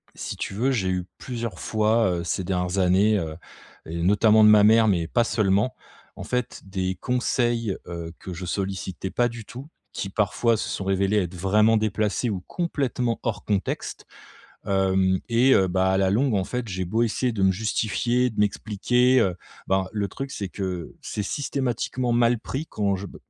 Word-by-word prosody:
si -, -, -6 dB
tu -, -, -4 dB
veux, 125 Hz, +6 st, +1 dB
j'ai 100 Hz, -8 st, 0 dB
eu 90 Hz, -1 st, -1 dB
plusieurs 115 Hz, -6 st, -5 dB
fois, 110 Hz, +1 st, +2 dB
heu, 85 Hz, -1 st, -2 dB
ces 85 Hz, +2 st, -2 dB
dernières 90 Hz, 0 st, -1 dB
années, 95 Hz, +4 st, +4 dB
heu, 80 Hz, -3 st, -4 dB, 0.5 s
et 85 Hz, +1 st, -5 dB
notamment 105 Hz, +4 st, +5 dB
de -, -, +8 dB
ma 105 Hz, -1 st, +7 dB
mère 110 Hz, +1 st, +6 dB
mais 85 Hz, -5 st, +1 dB
pas 120 Hz, +7 st, +2 dB
seulement, 105 Hz, +3 st, +1 dB, 0.4 s
en -, -, -6 dB
fait, 125 Hz, -1 st, -3 dB
des 95 Hz, -1 st, -2 dB
conseils, 120 Hz, -3 st, 0 dB
heu, 85 Hz, -1 st, -6 dB
que 95 Hz, -, -7 dB
je 90 Hz, +2 st, -6 dB
sollicitais 95 Hz, 0 st, -4 dB
pas 120 Hz, -, +2 dB
du 115 Hz, -2 st, -9 dB
tout, 130 Hz, +6 st, -9 dB, 0.3 s
qui 100 Hz, -, -4 dB
parfois 110 Hz, +3 st, +1 dB
se -, -, -3 dB
sont 95 Hz, -, -4 dB
révélés 95 Hz, +2 st, +1 dB
être 90 Hz, -3 st, -1 dB
vraiment 105 Hz, +5 st, +3 dB
déplacés 110 Hz, +2 st, 0 dB
ou 95 Hz, -3 st, -3 dB
complètement 135 Hz, -8 st, -1 dB
hors 105 Hz, -4 st, -3 dB
contexte. 100 Hz, -3 st, -2 dB, 0.6 s
Hem, 95 Hz, -1 st, +2 dB
et 120 Hz, +3 st, +4 dB
heu, 95 Hz, -1 st, +3 dB
ben, 95 Hz, +1 st, +1 dB
à 95 Hz, 0 st, +2 dB
la 95 Hz, -1 st, +2 dB
longue, 120 Hz, +4 st, +2 dB
en 100 Hz, -, +2 dB
fait, 125 Hz, +4 st, -4 dB
j'ai 95 Hz, -1 st, -3 dB
beau 110 Hz, +6 st, +1 dB
essayer 125 Hz, +2 st, 0 dB
de 105 Hz, -3 st, -2 dB
me 95 Hz, -, +4 dB
justifier, 110 Hz, +4 st, 0 dB
de 105 Hz, -, -3 dB
m'expliquer, 125 Hz, +5 st, +2 dB
heu, 95 Hz, -5 st, +1 dB, 0.3 s
ben, 95 Hz, 0 st, +2 dB
le 105 Hz, -2 st, -1 dB
truc, 135 Hz, +5 st, -6 dB
c'est 100 Hz, -, -4 dB
que 90 Hz, -3 st, -5 dB
c'est 105 Hz, -, -4 dB
systématiquement 125 Hz, -1 st, -2 dB
mal 120 Hz, 0 st, +3 dB
pris 140 Hz, +7 st, -4 dB
quand 100 Hz, -2 st, 0 dB
je 95 Hz, +2 st, -6 dB
b -, -, -12 dB
105 Hz, 190 wpm, -24 LUFS, 95-115 Hz, 0.6 s, de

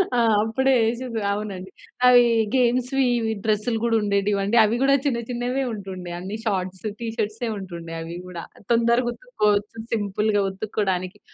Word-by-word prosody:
ఆ! -, -, +3 dB, 0.2 s
అప్పుడే 265 Hz, +5 st, +2 dB
ఏసేది 235 Hz, 0 st, -2 dB
అవునండి. 200 Hz, -2 st, -5 dB, 0.4 s
అవి 245 Hz, -1 st, +8 dB, 0.3 s
గేమ్స్‌వి 255 Hz, +2 st, +2 dB
ఇవి 225 Hz, -1 st, -1 dB
డ్రెస్‌లు 215 Hz, +2 st, +1 dB
గూడా 235 Hz, -1 st, +2 dB
ఉండేటివి 200 Hz, 0 st, +1 dB
అండి. 205 Hz, +4 st, +1 dB
అవి 215 Hz, +2 st, +2 dB
గూడా 275 Hz, 0 st, +5 dB
చిన్న, 250 Hz, -5 st, +1 dB
చిన్నవే 250 Hz, +2 st, -1 dB
ఉంటుండే. 190 Hz, -4 st, -7 dB
అన్ని 195 Hz, +4 st, -5 dB
షార్ట్స్, 190 Hz, -2 st, -2 dB
టీ 235 Hz, -, -4 dB
ష‌ర్ట్సే 225 Hz, +1 st, -2 dB
ఉంటుండే 170 Hz, -4 st, -7 dB
అవి 165 Hz, +1 st, -6 dB
గూడా 175 Hz, -2 st, -7 dB, 0.3 s
తొందరగా 235 Hz, +1 st, +2 dB
ఉత్తుక్కోవచ్చు. 210 Hz, -, -1 dB, 0.2 s
సింపుల్‌గా 205 Hz, -1 st, +1 dB
ఉత్తుక్కోడానికి, 190 Hz, -1 st, -2 dB
215 Hz, 145 wpm, -23 LUFS, 195-240 Hz, 0.4 s, అవి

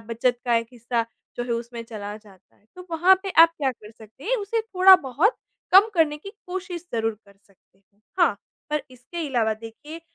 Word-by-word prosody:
बचत 235 Hz, +2 st, -1 dB
का 240 Hz, -1 st, +2 dB
एक 230 Hz, -, -1 dB
हिस्सा 235 Hz, -1 st, -2 dB, 0.3 s
जो 240 Hz, -, -2 dB
है 245 Hz, -, -7 dB
उसमें 235 Hz, 0 st, -5 dB
चला 210 Hz, -2 st, -7 dB
जाता 205 Hz, -4 st, -20 dB
है, -, -, -34 dB
तो 365 Hz, 0 st, -11 dB
वहाँ 350 Hz, +4 st, +5 dB
पे 390 Hz, -, -4 dB
आप 335 Hz, -, +7 dB
क्या 270 Hz, -3 st, +1 dB
कर 215 Hz, -3 st, -15 dB
सकते 220 Hz, +3 st, -16 dB
हैं, -, -, +1 dB
उसे 430 Hz, +2 st, -2 dB
थोड़ा-बहुत 375 Hz, -, +4 dB, 0.4 s
कम 390 Hz, +4 st, +8 dB
करने 315 Hz, -3 st, +2 dB
की 395 Hz, +7 st, -10 dB, 0.2 s
कोशिश 360 Hz, -1 st, -6 dB
ज़रूर 225 Hz, -1 st, 0 dB
कर 200 Hz, 0 st, -20 dB
सकते 195 Hz, 0 st, -32 dB, 0.4 s
हाँ, 290 Hz, -12 st, +4 dB, 0.3 s
पर 300 Hz, -1 st, 0 dB
इसके 265 Hz, +7 st, -7 dB
अलावा 225 Hz, -4 st, +1 dB
देखिए 230 Hz, +9 st, -11 dB
255 Hz, 190 wpm, -24 LUFS, 225-355 Hz, 0.4 s, कम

